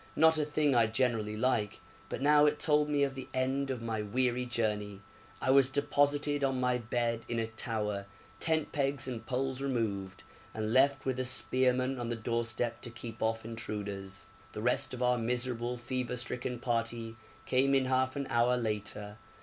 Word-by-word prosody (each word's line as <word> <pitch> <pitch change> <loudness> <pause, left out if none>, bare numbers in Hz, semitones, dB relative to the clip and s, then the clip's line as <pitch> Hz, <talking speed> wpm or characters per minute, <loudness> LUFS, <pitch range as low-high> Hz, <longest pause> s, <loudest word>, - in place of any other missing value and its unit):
not 160 0 +5
a - - +2
thing 150 -1 +1
I 115 -2 +5
generally 110 -2 0
like, 110 -4 0 0.3
but - - -4
now 150 +1 +6
it 150 0 +2
told 150 0 +2
me 145 -1 +2
of 135 -1 0
the 130 -1 -7
end 135 +2 0
of 125 -3 -3
my 110 -2 -2
weary 125 +3 0
journey. 105 -4 -1 0.4
I 130 - +2
was 135 -1 +6
deposited 145 +1 +1
on 135 -1 +1
my 125 -1 +1
bed 115 0 -1
in 120 - -1
a 115 - +1
tower, 105 -3 -3 0.3
tent 160 -1 0
pegs 140 -2 0
and 120 -3 -4
poles 130 +1 -2
removed, 105 -8 -2 0.3
and 110 0 -1
left 135 +1 +4
with 130 -1 -1
a - - +1
spearman 130 +1 +1
on 120 -1 -3
the 120 - -1
doorstep 115 +1 -2
to - - -7
keep 115 -1 -9
off 110 0 0
intruders. 100 -4 -5 0.3
The 105 - -5
rest 125 +1 +1
of 125 - -3
our 125 0 +3
miserable 120 +1 -1
fever 125 0 -3
stricken 125 +1 -3
party 115 -1 -2 0.3
came 135 +2 +3
in 135 -1 +3
half 130 0 +1
an 140 -1 -2
hour 120 +1 +3
later. 105 -2 -3
125 Hz, 180 wpm, -32 LUFS, 115-135 Hz, 0.4 s, now